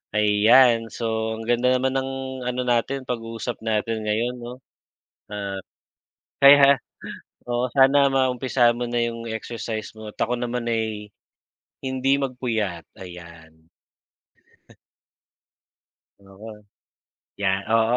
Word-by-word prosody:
ayan 115 +3 +5
so 110 -1 -3
ang 110 - -7
ganda 120 +2 +2
naman 130 +1 0
ng 135 0 -2 0.4
ano 125 0 -1
natin, 125 +2 0
pag-uusap 115 -1 -5
natin 110 0 -2
ngayon, 115 +4 0
‘no? 120 +1 -7 0.8
Ah, 100 -2 -5 0.8
kaya 140 -1 +8 0.7
oo, 120 +1 0
sana 140 +1 +5
maumpisahan 130 -2 +2
mo 120 - -2
na 120 0 -1
yung 115 0 -4
exercise 110 0 -5
mo 110 -1 -9
at - - -39
ako 120 +2 0
naman 120 0 -3
ay 110 -2 -2 0.7
hindi 130 0 0
magpuyat, 115 -9 -3
ayan. 85 -4 -13 2.5
Oo, 105 +2 -13 0.7
‘yan, 95 -1 -1
oo, 115 0 +3
115 Hz, 105 wpm, -23 LUFS, 105-125 Hz, 2.5 s, kaya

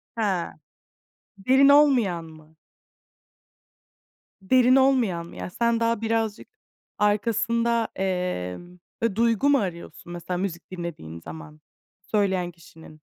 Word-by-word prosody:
Ha. 200 -6 -1 0.8
Derin 260 +8 +4
olmayan 255 - +4
mı? 155 0 -16 1.9
Derin 250 +5 +4
olmayan 250 -11 +2
mı? - - -13
Ya, - - -6
sen 235 +4 0
daha 230 -1 0
birazcık 225 -1 -1 0.5
arkasında, 230 +2 +1
emm, 180 - -3 0.2
eee, 230 -4 0
duygu 230 +4 +2
mu 285 - +5
arıyorsun, 175 -2 -6
mesela, 175 +1 -4
müzik 180 -2 -5
dinlediğin 170 - -7
zaman 155 - -11 0.4
söyleyen 190 -3 0
kişinin? 160 -2 -16
195 Hz, 105 wpm, -25 LUFS, 170-230 Hz, 1.9 s, mu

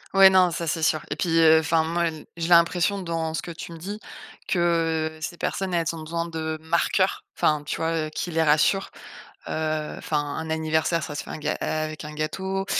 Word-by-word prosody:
Ouais, 195 0 +9
non, 185 -1 +5
ça 170 0 -3
c'est 165 +1 -1
sûr 155 -1 +2
et - - 0
puis, 165 -2 0
heu, 160 -1 +7
enfin, 160 +1 +2
moi 170 +1 0
n 155 -2 -6
j'ai 165 0 -3
l'impression 175 +3 +4
dans 165 -2 -2
ce - - -3
que 175 - -6
tu 170 - -8
me 165 - -8
dis 200 +6 -6 0.5
que 165 -3 +1
ces 170 +2 -5
personnes, 190 -1 -2
elles 170 -1 +1
ont 165 - -7
besoin 165 +2 -3
de 160 -1 -3
marqueurs, 170 +4 +1
enfin, 150 -1 +2
tu 145 - -3
vois, 165 0 -1 0.2
heu, - - -7
qui 175 +3 -4
les 165 0 +1
rassurent, 160 +5 +3 0.6
heu, 155 -1 -2
enfin, 150 - -1
un 145 +2 -4
anniversaire, 160 +1 0
ça 145 0 -5
se - - -4
fait - - -11
un - - -5
ga 150 0 -1
avec 155 -1 -3
un 150 0 -7
gâteau, 190 +5 -2
160 Hz, 215 wpm, -25 LUFS, 155-170 Hz, 0.6 s, Ouais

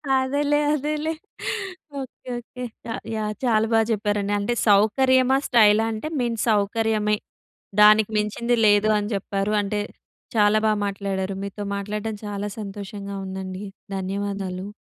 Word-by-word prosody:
అదేలే 285 +3 +2
అదేలే. 300 +2 -1 0.9
Okay, 260 -1 -9
okay. 250 +1 -8 0.2
య - - -3 0.2
యాహ్! 215 -1 -2
చాలా 225 -3 +3
బాగా 225 - +5
చెప్పారండి. 205 -1 0
అంటే 205 +4 0
సౌకర్యమా? 260 +6 +4
స్టైలా? 220 -2 +5
అంటే 220 +7 -4
మెయిన్ 235 -2 -1
సౌకర్యమే 210 0 +2 0.7
దానికి 215 0 +7
మించింది 225 +3 0
లేదు 205 +1 +5
అని 205 0 -2
చెప్పారు. 200 +1 -1
అంటే 205 +1 -2 0.6
చాలా 210 0 +5
బా - - +4
మాట్లాడారు. 195 -1 -2
మీతో 200 +1 -5
మాట్లాడడం 210 +2 -3
చాలా 205 0 -3
సంతోషంగా 200 -1 -6
ఉందండి. 190 +1 -5 0.3
ధన్యవాదాలు. 195 0 -3
210 Hz, 120 wpm, -24 LUFS, 200-225 Hz, 0.9 s, దానికి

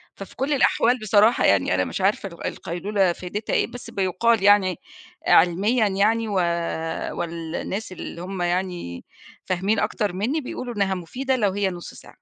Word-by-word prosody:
ففي 195 - -10
كُلّ 275 +3 -1
الأحوال 250 -2 +3
بصراحة 215 +2 +4
يعني 95 -2 +3
أنا 95 0 +1
مش - - -4
عارفة 195 +1 +1
ال 170 - -10
القيلولة 190 +1 -1
فايدتها 195 +5 -5
إيه - - +2
بس 245 -1 -10
بيُقال 200 +2 +1
يعني 200 -2 +5 0.5
علميًا 205 +7 +4
يعني 215 +4 +1
و 205 - -3 0.8
والناس 170 +5 -4
اللي 170 -1 -7
هم 185 0 -5
يعني 175 - -2 0.4
فاهمين 190 +4 0
أكتر 205 -4 -1
مِنّي 240 - -1
بيقولوا 250 -2 -6
إنّها 195 -2 +1
مفيدة 255 +10 -2
لو 210 -6 +1
هي 200 0 0
نُصّ 175 -2 -8
ساعة. - - -14
195 Hz, 155 wpm, -23 LUFS, 180-220 Hz, 0.8 s, يعني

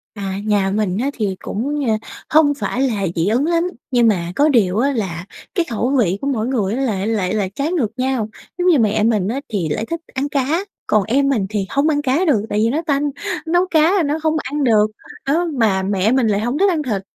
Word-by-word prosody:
À, 195 -1 -4
nhà 205 -2 +2
mình 200 -2 0
á, 275 - 0
thì 205 -6 -2
cũng, 280 +7 -2
ơ, - - +3 0.4
hông 300 -2 +5
phải 265 -2 -3
là 220 -7 0
dị 165 +2 +1
ứng 245 +8 +2
lắm, 335 0 +2 0.3
nhưng 240 -2 +4
mà 175 -5 0
có 295 +2 +4
điều 210 -8 +3
á, 275 +3 +2
là 190 -8 -3 0.3
cái 345 -3 +1
khẩu 235 +1 -1
vị 190 -4 +2
của 280 - -2
mỗi 235 -5 0
người 220 -7 0
á 265 - -1
là 205 -6 -1
lại 210 -4 0
lại 200 -3 0
trái 295 +5 -1
ngược 255 - 0
nhau. 255 -4 -1 0.3
Giống 360 0 0
như 335 -6 +5
mẹ 215 -1 +2
mình 215 -4 +2
á, 250 +5 -2
thì 190 -8 -2
lại 215 +9 -2
thích 335 0 -2
ăn 275 +2 -2
cá, 295 +7 0 0.2
còn 215 -2 +3
em 275 +6 +1
mình 225 -8 +1
thì 205 -3 -1
hông 280 +3 +1
ăn 290 -2 +1
cá 290 +6 +1
được 270 - +3
tại 210 - 0
vì 225 - +3
nó 300 +7 0
tanh, 285 0 +1 0.4
nấu 350 +3 +3
cá 320 +3 +4
thì 360 - +2
nó 295 +1 0
hông 315 0 +2
ăn 290 +1 -2
được. 215 -4 +4 0.4
Đó, 330 +5 +2
mà 190 -4 +2
mẹ 200 +2 +1
mình 255 -3 +2
lại 205 -1 +1
hông 240 +5 -1
thích 395 +4 +4
ăn 325 -4 0
thịt, 210 -7 -2
240 Hz, 245 wpm, -19 LUFS, 205-290 Hz, 0.4 s, hông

